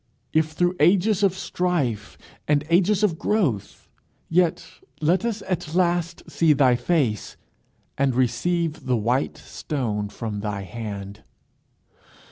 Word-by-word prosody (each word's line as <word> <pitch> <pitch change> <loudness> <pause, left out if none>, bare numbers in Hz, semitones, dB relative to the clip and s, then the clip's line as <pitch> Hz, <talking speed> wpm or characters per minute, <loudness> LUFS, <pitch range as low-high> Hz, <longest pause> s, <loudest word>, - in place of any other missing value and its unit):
If 155 0 +1
through 175 +2 +1
ages 195 +5 +3
of 190 -2 +2
strife 140 - -2 0.3
and 145 -1 +2
ages 190 +4 +3
of 170 -6 +1
growth, 160 - -1 0.4
yet 175 0 +2 0.3
let 170 +7 +2
us 225 -3 -2
at 175 -3 -3
last 175 -2 +1
see 160 0 +3
thy 130 -3 +4
face, 125 - -1 0.6
and 135 -3 +2
receive 150 +6 0
the 125 -1 +2
white 120 +5 0
stone 110 -8 -3
from 105 0 -5
thy 100 -1 -3
hand. 100 -1 -7
155 Hz, 120 wpm, -24 LUFS, 120-175 Hz, 0.6 s, thy